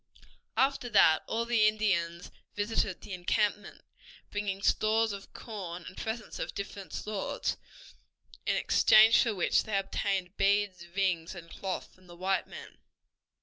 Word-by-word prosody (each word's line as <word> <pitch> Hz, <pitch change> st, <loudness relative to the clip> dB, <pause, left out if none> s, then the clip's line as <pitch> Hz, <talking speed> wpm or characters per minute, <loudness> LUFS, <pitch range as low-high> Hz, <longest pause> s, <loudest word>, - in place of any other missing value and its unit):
After 265 Hz, -2 st, +1 dB
that 160 Hz, -7 st, +5 dB
all 230 Hz, +1 st, -1 dB
the 230 Hz, -3 st, +4 dB
Indians 180 Hz, -6 st, 0 dB, 0.2 s
visited 205 Hz, -2 st, -1 dB
the 200 Hz, -, -8 dB
encampment, 205 Hz, +3 st, -1 dB, 0.5 s
bringing 200 Hz, -1 st, -3 dB
stores 220 Hz, +1 st, +2 dB
of 200 Hz, 0 st, -9 dB
corn 180 Hz, -6 st, -7 dB
and 185 Hz, -, -10 dB
presents 220 Hz, 0 st, -5 dB
of -, -, -4 dB
different 200 Hz, -1 st, -6 dB
sorts, 210 Hz, -2 st, -3 dB, 0.9 s
in -, -, +2 dB
exchange 220 Hz, +2 st, +6 dB
for 230 Hz, -4 st, 0 dB
which 180 Hz, -, +2 dB
they 210 Hz, -2 st, -1 dB
obtained 195 Hz, -1 st, -2 dB
beads, 195 Hz, -3 st, +1 dB
rings, 180 Hz, -2 st, -1 dB
and 170 Hz, -1 st, -11 dB
cloth 190 Hz, -2 st, -5 dB
from 185 Hz, 0 st, -22 dB
the 175 Hz, 0 st, -13 dB
white 190 Hz, +2 st, 0 dB
men. -, -, -11 dB
200 Hz, 140 wpm, -30 LUFS, 185-215 Hz, 0.9 s, exchange